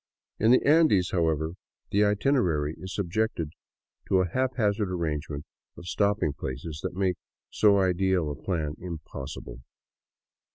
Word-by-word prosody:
In 110 - +4
the 125 - +5
Andes, 150 - +5
however, 80 -3 +1 0.4
the 100 +1 +4
itinerary 100 - +2
is 95 0 -6
subjected 95 -4 -1 0.6
to 95 -1 +4
a 90 - 0
hap 130 +7 -1
hazard 105 -3 +1
arrangement 75 -4 -3 0.3
of 85 - -10
stopping 100 -5 +1
places 75 +3 -6
that - - -4
make 95 -2 +1 0.3
so 105 -2 +4
ideal 95 -3 +2
a - - -4
plan 75 -2 -2
impossible. 85 -7 -7
90 Hz, 130 wpm, -27 LUFS, 80-105 Hz, 0.6 s, the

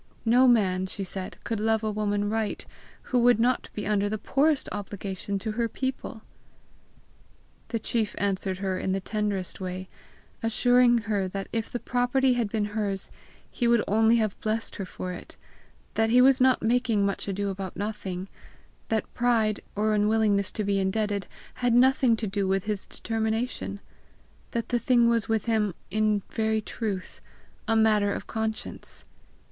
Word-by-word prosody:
No 245 +3 +5
man, 190 -6 +3
she 195 - -5
said, 190 0 -5
could 225 -2 -2
love 220 +1 +1
a 215 - 0
woman 205 -1 0
right, 220 0 -2 0.5
who 250 - +5
would 240 -1 +5
not 245 +2 +1
be 210 - -4
under 205 0 +1
the 215 - -2
poorest 285 +6 +1
obligation 200 -1 -4
to 215 +3 -3
her 230 +1 -1
people! 260 -3 -4 1.4
The 230 - -2
chief 220 -1 -1
answered 190 -1 -1
her 190 -1 -2
in 190 - -1
the 195 - 0
tenderest 200 -2 -3
way, 185 0 -5 0.5
assuring 245 +1 +4
her 205 -3 0
that 195 +1 -5
if 225 -1 -2
the 245 - -3
property 250 +2 +2
had 235 -4 0
been 215 -1 0
hers 200 -3 -2 0.4
he 240 - 0
would 235 -2 +4
only 220 +3 +4
have 215 -4 0
blessed 220 +1 -2
her 195 - -3
for 180 0 -6
it; - - -10 0.6
that 225 0 +2
he 245 +2 +5
was 260 +1 +6
not 260 -2 +4
making 230 -3 +2
much 200 0 -2
ado 200 +1 -1
about 190 -1 -5
nothing; 195 -3 -4 0.6
that 220 -1 -1
pride, 225 -3 +2 0.2
or 215 +1 +1
unwillingness 210 -1 +2
to 215 - -2
be 200 -1 +1
indebted, 200 0 -1 0.3
had 245 -1 +3
nothing 255 -1 +5
to 225 - -3
do 200 -1 -1
with 190 0 +1
his 210 -2 -1
determination; 225 -2 -2 0.7
that 230 -1 -3
the 245 - +1
thing 240 0 +4
was 230 -2 +1
with 220 -1 +1
him 215 -5 +1 0.2
in 215 -1 +1
very 220 0 +1
truth 210 -3 -5 0.5
a 225 - +2
matter 215 -2 +4
of - - -4
conscience. 220 -1 -4
215 Hz, 165 wpm, -27 LUFS, 200-230 Hz, 1.4 s, was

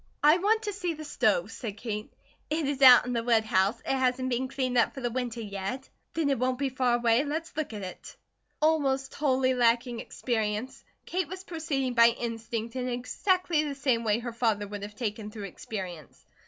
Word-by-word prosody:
"I 305 +4 +6
want 435 +4 +2
to 415 -1 -3
see 360 -4 -2
the 310 - -8
stove," - - +1
said 215 -4 -6
Kate. 210 -1 -5 0.4
"It 310 -1 0
is 280 -1 -2
out 255 -2 +9
in 250 - -2
the 230 -1 0
woodhouse. 220 -2 +2
It 270 - -1
hasn't 255 0 0
been 250 +2 0
cleaned 255 -1 -2
up 235 - +3
for - - -5
the 240 -1 -1
winter 245 -1 -3
yet." 205 +6 -5 0.3
"Then 310 -3 +1
it 270 - 0
won't 255 0 +1
be 275 0 0
far 255 -2 +1
away. 235 +2 +3
Let's 315 +3 -4
look 310 -4 -2
at 210 -2 -6
it." 185 - -9 0.5
Almost 275 -4 +2
wholly 260 -3 +2
lacking 240 0 +2
experience, 220 0 -3 0.2
Kate 365 -2 -1
was 375 +3 -7
proceeding 310 -8 -2
by 235 -1 +7
instinct 230 0 -4
in 255 -1 -2
exactly 320 +7 0
the 290 -2 -3
same 260 -4 +1
way 215 -1 +2
her 240 0 -5
father 220 -3 0
would 205 0 -6
have 205 +1 -7
taken 215 -2 -4
through 210 -1 -8
experience. 180 - -7
250 Hz, 195 wpm, -28 LUFS, 225-280 Hz, 0.5 s, out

